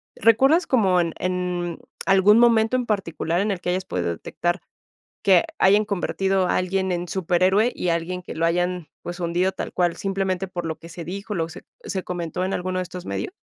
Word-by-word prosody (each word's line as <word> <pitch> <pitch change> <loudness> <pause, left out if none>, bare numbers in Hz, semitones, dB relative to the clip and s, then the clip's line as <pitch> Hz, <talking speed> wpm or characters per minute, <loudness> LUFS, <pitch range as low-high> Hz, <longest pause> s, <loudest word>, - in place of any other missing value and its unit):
¿Recuerdas 270 - +4
como 195 -8 +3
en 170 -2 0
en 180 -2 -2 0.3
algún 195 +3 +6
momento 230 0 +4
en 250 -1 0
particular 175 -3 -1
en 210 0 0
el 185 - -3
que 180 - -2
hayas 185 +1 -1
podido 90 - -2
detectar 175 - -2 0.6
que 190 -4 +5
hayan 205 +3 +5
convertido 195 -1 0
a - - +2
alguien 190 0 0
en 175 0 -2
superhéroe? 190 +5 +2
¿Y 180 - -2
alguien 175 +2 -2
que - - -8
lo 165 +1 +1
hayan, 175 -1 0
pues, 175 +1 -6
hundido 175 +3 +1
tal - - -5
cual?, 175 -2 +1
simplemente 195 -1 -2
por 175 -2 -5
lo 160 -1 -4
que 165 - -12
se 170 -1 -8
dijo, 200 +5 -5
lo 165 -2 -1
se - - -9
c - - -34 0.2
se 190 -2 -3
comentó 175 0 -3
en 190 - -1
alguno 185 +1 -2
de 185 - -1
estos 180 0 -8
medios. - - -4
185 Hz, 205 wpm, -23 LUFS, 175-195 Hz, 0.6 s, algún